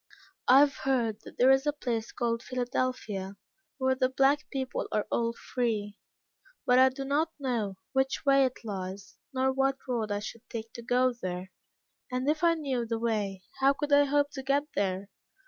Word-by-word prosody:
I 265 Hz, +2 st, +8 dB
have 285 Hz, -1 st, +3 dB
heard 235 Hz, -5 st, 0 dB
that -, -, -13 dB
there 255 Hz, +2 st, +6 dB
is 270 Hz, +2 st, +3 dB
a 295 Hz, -, +2 dB
place 235 Hz, -6 st, -3 dB
called 230 Hz, -1 st, -1 dB
Philadelphia, 245 Hz, -6 st, -2 dB, 0.4 s
where 260 Hz, -1 st, +2 dB
the 260 Hz, -1 st, +1 dB
black 275 Hz, +3 st, +2 dB
people 260 Hz, -2 st, -3 dB
are 210 Hz, -, 0 dB
all 230 Hz, 0 st, +1 dB
free, 220 Hz, -4 st, -2 dB, 0.7 s
but 250 Hz, +1 st, +5 dB
I 260 Hz, 0 st, +7 dB
do 270 Hz, +1 st, -6 dB
not 295 Hz, +4 st, +1 dB
know 235 Hz, -8 st, -2 dB, 0.2 s
which 265 Hz, +1 st, 0 dB
way 275 Hz, -1 st, +6 dB
it 255 Hz, -1 st, -4 dB
lies, 190 Hz, -2 st, -6 dB
nor 265 Hz, 0 st, +1 dB
what 270 Hz, 0 st, +1 dB
road 230 Hz, -4 st, -1 dB
I 205 Hz, -, +1 dB
should 220 Hz, +2 st, -8 dB
take 225 Hz, 0 st, -6 dB
to 235 Hz, -, -7 dB
go 250 Hz, +1 st, +2 dB
there; 185 Hz, -4 st, -5 dB, 0.6 s
and 255 Hz, +2 st, -1 dB
if 310 Hz, +2 st, +1 dB
I 335 Hz, -1 st, +5 dB
knew 270 Hz, -6 st, -1 dB
the 230 Hz, 0 st, -2 dB
way, 210 Hz, -5 st, -1 dB, 0.2 s
how 270 Hz, +1 st, +5 dB
could 290 Hz, +1 st, -2 dB
I 285 Hz, 0 st, +7 dB
hope 285 Hz, 0 st, +2 dB
to 270 Hz, -, -6 dB
get 275 Hz, +2 st, +1 dB
there? 195 Hz, 0 st, -1 dB
255 Hz, 185 wpm, -29 LUFS, 220-270 Hz, 0.7 s, I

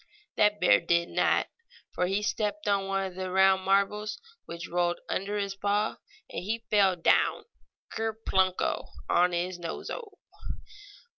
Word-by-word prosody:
That 210 Hz, 0 st, +3 dB
bear 100 Hz, -, +5 dB
did 170 Hz, 0 st, +1 dB
not, -, -, +2 dB, 0.5 s
for 180 Hz, -, 0 dB
he 195 Hz, +3 st, 0 dB
stepped 210 Hz, -1 st, -2 dB
on 200 Hz, -1 st, +1 dB
one 195 Hz, 0 st, 0 dB
of 190 Hz, -, -6 dB
the 185 Hz, 0 st, -4 dB
round 190 Hz, 0 st, +4 dB
marbles, 200 Hz, +2 st, +1 dB, 0.3 s
which 170 Hz, 0 st, -7 dB
rolled 175 Hz, 0 st, 0 dB
under 200 Hz, +2 st, -2 dB
his 200 Hz, -1 st, -2 dB
paw 205 Hz, +2 st, 0 dB, 0.3 s
and -, -, -6 dB
he 225 Hz, +4 st, -3 dB
fell 195 Hz, -3 st, +4 dB
down 170 Hz, -, +2 dB, 0.5 s
ker 225 Hz, 0 st, -1 dB, 0.2 s
punko! 185 Hz, -1 st, +1 dB, 0.2 s
on 180 Hz, +1 st, +3 dB
his 175 Hz, +1 st, -2 dB
nose 165 Hz, -1 st, -5 dB
o! 410 Hz, -4 st, -7 dB
195 Hz, 150 wpm, -28 LUFS, 180-210 Hz, 0.5 s, bear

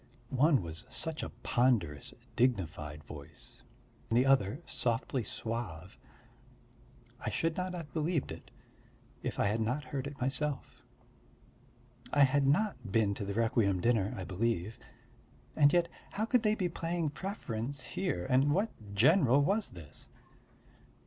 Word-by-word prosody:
One 140 Hz, -, +4 dB
was 85 Hz, -1 st, -6 dB
such 160 Hz, -1 st, -2 dB
a -, -, -4 dB
ponderous, 110 Hz, -, +1 dB, 0.2 s
dignified 80 Hz, -, 0 dB
voice, 70 Hz, -1 st, -9 dB, 0.5 s
the 120 Hz, +3 st, +4 dB
other 135 Hz, -, +3 dB
softly 120 Hz, +1 st, -1 dB
suave; 105 Hz, -8 st, -5 dB, 1.2 s
I -, -, -1 dB
should 165 Hz, 0 st, 0 dB
not 180 Hz, 0 st, -2 dB
have 165 Hz, -4 st, -7 dB
believed 160 Hz, -1 st, 0 dB
it -, -, -9 dB, 0.7 s
if -, -, -4 dB
I -, -, +3 dB
had 105 Hz, +3 st, +1 dB
not 125 Hz, +7 st, 0 dB
heard 140 Hz, -2 st, -4 dB
it 140 Hz, 0 st, -8 dB
myself. 135 Hz, +2 st, -2 dB, 1.3 s
I 145 Hz, -, +4 dB
had 140 Hz, +1 st, +3 dB
not 140 Hz, -, +1 dB
been 105 Hz, -2 st, +3 dB
to 100 Hz, -, -5 dB
the 100 Hz, 0 st, -3 dB
requiem 110 Hz, -4 st, +2 dB
dinner, 110 Hz, -1 st, +2 dB
I 95 Hz, -, -4 dB
believe. 105 Hz, +1 st, -1 dB, 0.8 s
And 145 Hz, -2 st, +6 dB
yet 175 Hz, 0 st, +3 dB, 0.2 s
how 215 Hz, -, -1 dB
could 245 Hz, +1 st, +3 dB
they 215 Hz, -1 st, +2 dB
be 185 Hz, -4 st, 0 dB
playing 165 Hz, -2 st, -2 dB
preference 140 Hz, -, -4 dB
here 175 Hz, -, -2 dB
and 135 Hz, +3 st, +4 dB
what 205 Hz, +4 st, +1 dB, 0.2 s
general 135 Hz, -, +5 dB
was 200 Hz, +6 st, +1 dB
this? 80 Hz, -5 st, -11 dB
130 Hz, 135 wpm, -32 LUFS, 105-155 Hz, 1.3 s, And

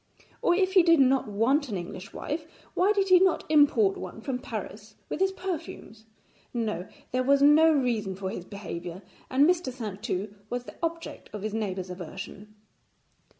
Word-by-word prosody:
Or 350 Hz, -, +3 dB
if 380 Hz, 0 st, +1 dB
he 380 Hz, -, +8 dB
did 335 Hz, -2 st, +5 dB
not 265 Hz, -2 st, +4 dB
want 250 Hz, +8 st, +1 dB
an 200 Hz, -, -2 dB
English 185 Hz, +2 st, -7 dB
wife, 310 Hz, +1 st, -4 dB, 0.3 s
why 380 Hz, +3 st, +3 dB
did 395 Hz, -2 st, +1 dB
he 365 Hz, -1 st, +8 dB
not 375 Hz, -2 st, +3 dB
import 285 Hz, -10 st, +4 dB
one -, -, -7 dB
from 250 Hz, +2 st, -3 dB
Paris 215 Hz, -3 st, -7 dB
with -, -, -3 dB
his 385 Hz, 0 st, +3 dB
perfumes? 330 Hz, -, -6 dB, 0.5 s
No, 215 Hz, -6 st, -2 dB, 0.2 s
there 255 Hz, -, +1 dB
was 280 Hz, +2 st, +4 dB
no 310 Hz, +3 st, +7 dB
reason 235 Hz, -9 st, 0 dB
for 190 Hz, 0 st, -4 dB
his 180 Hz, -, -6 dB
behaviour, 180 Hz, -2 st, -7 dB, 0.3 s
and 275 Hz, +3 st, +4 dB
Mr. 350 Hz, -6 st, +1 dB
Saintou 210 Hz, -4 st, -4 dB, 0.2 s
was 245 Hz, 0 st, -3 dB
the -, -, -10 dB
object 335 Hz, 0 st, -4 dB
of 210 Hz, -2 st, -6 dB
his 215 Hz, -1 st, -3 dB
neighbours' 190 Hz, -4 st, -3 dB
aversion. 195 Hz, +4 st, -8 dB
245 Hz, 170 wpm, -27 LUFS, 205-315 Hz, 0.5 s, he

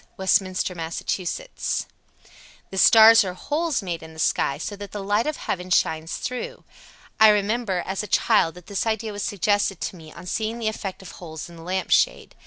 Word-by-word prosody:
Westminster, 190 Hz, -1 st, +1 dB
Mass. 165 Hz, -1 st, -5 dB
82. 200 Hz, -, -3 dB, 1.2 s
The 190 Hz, -, -6 dB
stars 225 Hz, +1 st, +8 dB
are 180 Hz, -2 st, -5 dB
holes 300 Hz, -, -1 dB
made 170 Hz, -3 st, -4 dB
in 160 Hz, 0 st, -11 dB
the 160 Hz, -, -12 dB
sky, 140 Hz, -3 st, +1 dB
so 205 Hz, -, -5 dB
that 200 Hz, 0 st, -9 dB
the 205 Hz, -1 st, -5 dB
light 205 Hz, +6 st, +1 dB
of 305 Hz, -, -2 dB
heaven 180 Hz, -1 st, -4 dB
shines 160 Hz, -2 st, +1 dB
through. 485 Hz, -, -5 dB, 0.6 s
"I 220 Hz, 0 st, +9 dB
remember, 210 Hz, -2 st, +1 dB
as 190 Hz, +1 st, -2 dB
a 210 Hz, -, -6 dB
child, 165 Hz, -3 st, +2 dB
that 180 Hz, -1 st, -13 dB
this 200 Hz, +2 st, -2 dB
idea 220 Hz, 0 st, -1 dB
was 205 Hz, -, -5 dB
suggested 205 Hz, -1 st, 0 dB
to -, -, -3 dB
me 160 Hz, -3 st, -13 dB
on 170 Hz, -, -12 dB
seeing 220 Hz, +4 st, -2 dB
the 225 Hz, -2 st, -1 dB
effect 195 Hz, -3 st, -6 dB
of 190 Hz, -, -10 dB
holes 160 Hz, -2 st, -9 dB
in -, -, -13 dB
the 165 Hz, -, -12 dB
lamp 185 Hz, +2 st, -3 dB
shade. -, -, +2 dB
195 Hz, 195 wpm, -24 LUFS, 175-220 Hz, 1.2 s, I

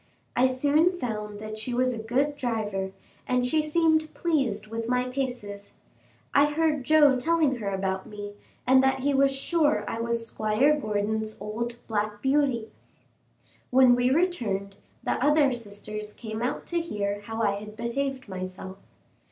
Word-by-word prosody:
I 255 Hz, +1 st, +5 dB
soon 295 Hz, +7 st, +2 dB
found 210 Hz, -6 st, -4 dB
that 215 Hz, 0 st, -6 dB
she 240 Hz, +3 st, -3 dB
was 255 Hz, 0 st, +2 dB
a 230 Hz, -, -5 dB
good 265 Hz, +6 st, 0 dB
driver, 210 Hz, -7 st, -2 dB, 0.4 s
and 250 Hz, 0 st, +1 dB
she 310 Hz, +5 st, +2 dB
seemed 315 Hz, 0 st, +2 dB
pleased 265 Hz, -12 st, 0 dB
with 225 Hz, +1 st, -5 dB
my 250 Hz, 0 st, +1 dB
paces. 245 Hz, -6 st, -5 dB, 0.6 s
I 285 Hz, +1 st, +6 dB
heard 300 Hz, -2 st, +1 dB
Joe 295 Hz, -3 st, +5 dB
telling 310 Hz, -2 st, +2 dB
her 210 Hz, -4 st, -3 dB
about 190 Hz, -1 st, -2 dB
me, 205 Hz, -1 st, -7 dB, 0.3 s
and 260 Hz, +1 st, +6 dB
that 265 Hz, 0 st, +2 dB
he 285 Hz, +2 st, +1 dB
was 275 Hz, 0 st, +4 dB
sure 295 Hz, +3 st, +1 dB
I 225 Hz, -, -3 dB
was 235 Hz, 0 st, -1 dB
Squire 225 Hz, +7 st, +2 dB
Gordon's 215 Hz, -3 st, -2 dB
old 230 Hz, +4 st, -4 dB
"Black 210 Hz, -1 st, -2 dB
Beauty." 265 Hz, -3 st, +1 dB, 1.0 s
When 255 Hz, -1 st, +6 dB
we 245 Hz, +1 st, +3 dB
returned, 235 Hz, -, 0 dB, 0.3 s
the -, -, -1 dB
other 295 Hz, -1 st, +4 dB
sisters 210 Hz, -2 st, -6 dB
came 220 Hz, -1 st, -6 dB
out 245 Hz, -, -2 dB
to 345 Hz, -1 st, -1 dB
hear 205 Hz, -10 st, -3 dB
how 225 Hz, +2 st, -4 dB
I 200 Hz, -1 st, +1 dB
had 210 Hz, +1 st, -10 dB
behaved 260 Hz, +3 st, -3 dB
myself. 185 Hz, 0 st, -7 dB
245 Hz, 155 wpm, -27 LUFS, 210-280 Hz, 1.0 s, I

